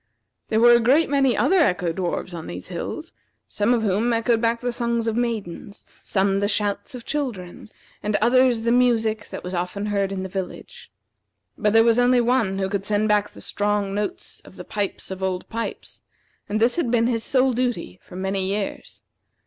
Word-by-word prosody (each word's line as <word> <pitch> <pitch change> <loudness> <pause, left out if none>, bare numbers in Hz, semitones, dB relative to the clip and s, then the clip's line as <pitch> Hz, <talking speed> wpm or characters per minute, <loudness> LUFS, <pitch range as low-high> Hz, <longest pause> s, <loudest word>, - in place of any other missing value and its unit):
There 220 - +1
were 240 +1 +7
a 235 - +6
great 270 +6 +3
many 270 -3 +3
other 380 - +3
Echo 180 - +2
dwarfs 180 0 -3
on 165 -2 -7
these 90 +1 -7
hills, - - -6 0.3
some 210 +3 0
of 235 -2 +2
whom 215 +4 +1
echoed 230 0 +1
back 230 0 +1
the 245 0 -2
songs 235 -1 -1
of 225 -1 -1
maidens, 215 -5 -4 0.2
some 195 0 +1
the 200 - +1
shouts 205 +5 -1
of 240 - -9
children, 225 -11 -4 0.3
and 210 0 -1
others 245 +1 +3
the 235 - +2
music 225 -3 +2
that - - -7
was 180 - -6
often 180 +3 -3
heard 200 -2 0
in 190 -1 -3
the - - -4
village. 190 -1 -7 0.7
But 210 -1 +1
there 225 0 +7
was 230 +1 +3
only 245 0 +4
one 235 -5 +1
who 190 -1 0
could 195 0 -3
send 215 +1 +1
back 210 0 +2
the - - -14
strong 205 -1 -1
notes 210 - -4
of - - -16
the - - -9
pipes 205 -2 -4
of 190 0 -6
Old 185 -1 -2
Pipes, 230 0 -5 0.5
and 215 - 0
this 235 +6 +3
had 335 -9 0
been 230 -1 +2
his 230 -2 0
sole 260 -1 +2
duty 245 - -2
for - - -14
many 190 +1 -1
years. 195 +1 -4
215 Hz, 195 wpm, -23 LUFS, 195-240 Hz, 0.7 s, were